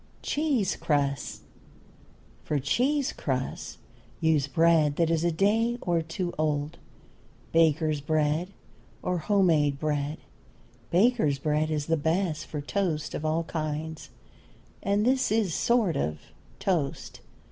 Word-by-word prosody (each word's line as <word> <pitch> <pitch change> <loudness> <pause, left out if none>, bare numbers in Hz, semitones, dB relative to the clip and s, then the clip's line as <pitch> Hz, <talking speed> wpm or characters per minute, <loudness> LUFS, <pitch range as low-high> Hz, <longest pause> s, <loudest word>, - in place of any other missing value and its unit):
CHEESE 290 -9 0
CRUSTS. 140 -2 -1 1.0
For 150 - -1
cheese 260 - +1
crusts 130 -2 -3 0.4
use 155 -3 +2
bread 160 -2 +3
that 165 0 +2
is 165 0 +1
a 175 - +2
day 220 +7 +2
or 170 -5 0
two 175 +2 -4
old, 150 -1 -1 0.7
baker's 155 -2 +3
bread 155 +3 +1 0.6
or 180 -1 0
home 200 +3 +2
made 150 -5 +3
bread; 150 0 -1 0.7
baker's 190 - +3
bread 150 +2 0
is 150 -2 -1
the 165 +1 +1
best 160 +1 -1
for 150 - -4
toast 160 -1 -2
of - - -4
all 160 +2 +1
kinds, 155 -1 -4 0.7
and 200 +2 +1
this 255 -2 +2
is 220 -3 +2
a - - -4
sort 225 -1 +2
of 75 +2 -1 0.4
toast. 165 -8 -2
160 Hz, 125 wpm, -27 LUFS, 150-190 Hz, 1.0 s, bread